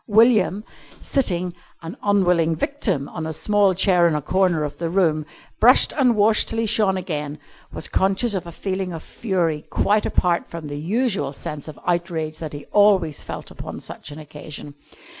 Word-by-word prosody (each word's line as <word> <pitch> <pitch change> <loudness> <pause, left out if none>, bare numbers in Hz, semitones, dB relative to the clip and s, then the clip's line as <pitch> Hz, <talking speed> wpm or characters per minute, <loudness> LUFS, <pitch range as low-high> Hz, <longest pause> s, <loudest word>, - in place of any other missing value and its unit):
William, 215 -2 +4 0.4
sitting, 180 -10 -1 0.3
an 165 +2 -7
unwilling 180 -5 +2
victim, 195 - -1
on 160 -2 -5
a - - -3
small 200 +2 +2
chair 180 -2 +4
in 160 - 0
a 150 - -1
corner 180 -2 +1
of 145 - -5
the 165 -1 -3
room, 160 -5 +1 0.3
brushed - - +6
and 255 -5 +3
washed 215 +1 +4
till 225 - -4
he 225 - +1
shone 200 -3 +2
again, 150 -5 -4 0.3
was - - -3
conscious 195 +4 +1
of 180 -3 -3
a - - -7
feeling 190 +1 -3
of 165 - -7
fury 175 -8 -1
quite 210 +1 +1
apart 175 -1 +1
from 165 -2 -8
the 145 0 -5
usual 195 - 0
sense 145 +1 -6
of 155 - -9
outrage 170 -3 -2
that 155 -2 -6
he 145 0 -8
always 195 -7 +3
felt - - -7
upon - - -8
such - - -8
an 145 - -9
occasion. 150 -1 -9
175 Hz, 180 wpm, -22 LUFS, 155-205 Hz, 0.4 s, brushed